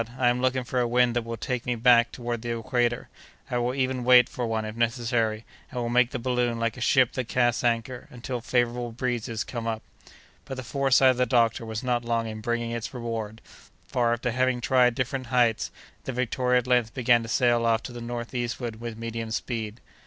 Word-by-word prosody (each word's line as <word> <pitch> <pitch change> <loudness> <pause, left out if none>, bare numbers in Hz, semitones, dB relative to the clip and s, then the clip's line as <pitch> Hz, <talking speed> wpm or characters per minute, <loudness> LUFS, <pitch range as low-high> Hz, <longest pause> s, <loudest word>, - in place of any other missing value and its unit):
I 125 -1 +3
am 125 +1 0
looking 130 0 +1
for 125 +1 -2
a 120 - +2
wind 120 0 +3
that 120 - +2
will 115 0 -5
take 125 +2 -3
me 125 - +1
back 120 0 +5
toward 120 -1 -4
the 120 0 -3
equator. 120 0 0 0.4
I 125 - +1
will 120 +2 -1
even 130 -2 -1
wait 125 -1 +7
for 120 -2 -3
one, 110 -1 -1
if 110 0 -6
necessary, 115 -2 0 0.2
and 125 - -5
will 120 -1 -2
make 125 0 +3
the 130 - -4
balloon 125 -1 0
like 115 -1 -1
a 125 - -9
ship 125 0 +4
that 130 -3 -3
casts 120 -2 +1
anchor, 120 +1 -1
until 125 0 -5
favorable 120 0 0
breezes 115 -2 -2
come 115 -2 -5
up." 110 -1 -3 0.6
But 135 - -6
the 130 - -5
foresight 135 +1 +4
of 125 - -3
the 125 0 +2
doctor 115 0 +2
was 110 +2 -4
not 120 -1 0
long 115 -1 0
in 110 -1 -6
bringing 120 +1 -2
its 120 +2 -5
reward; 115 -2 -4 0.4
for, 120 -2 +1
after 120 +1 -1
having 130 +1 +1
tried 125 0 +3
different 130 0 -2
heights, 120 -2 +2 0.4
the - - -2
Victoria 125 0 +1
at - - -17
length 125 -3 +1
began 120 -2 +4
to 115 - -7
sail 120 -1 +3
off 115 0 +2
to - - -7
the 120 0 -8
northeastward 120 -1 -4
with 115 -2 -6
medium 115 0 -4
speed. 110 -1 -4
120 Hz, 210 wpm, -26 LUFS, 115-125 Hz, 0.6 s, wait